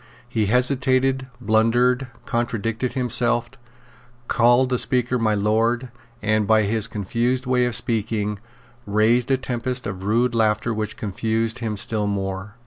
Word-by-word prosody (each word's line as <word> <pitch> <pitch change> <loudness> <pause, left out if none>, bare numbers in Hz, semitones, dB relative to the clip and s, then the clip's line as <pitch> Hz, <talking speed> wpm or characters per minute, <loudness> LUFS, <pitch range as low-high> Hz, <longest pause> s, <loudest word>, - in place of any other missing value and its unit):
He 110 -3 -1
hesitated, 130 +2 +2
blundered, 120 +3 +2 0.2
contradicted 115 +1 -2
himself, 120 -1 +1 0.8
called 120 +2 +4
the 125 -2 +1
Speaker 125 -1 0
My 110 -2 +1
Lord, 115 +4 +1 0.3
and, 110 -1 +1
by 110 0 +4
his 110 +1 0
confused 120 +4 -1
way 125 -1 +2
of 120 - -2
speaking, 105 -3 -1 0.5
raised 110 +4 +2
a 135 - +3
tempest 125 0 -3
of 95 -2 -5
rude 115 +3 +2
laughter 110 0 +1
which 110 -1 -3
confused 110 +2 -2
him 110 -3 -3
still 105 +1 -1
more. 95 +1 -4
115 Hz, 135 wpm, -22 LUFS, 110-125 Hz, 0.8 s, called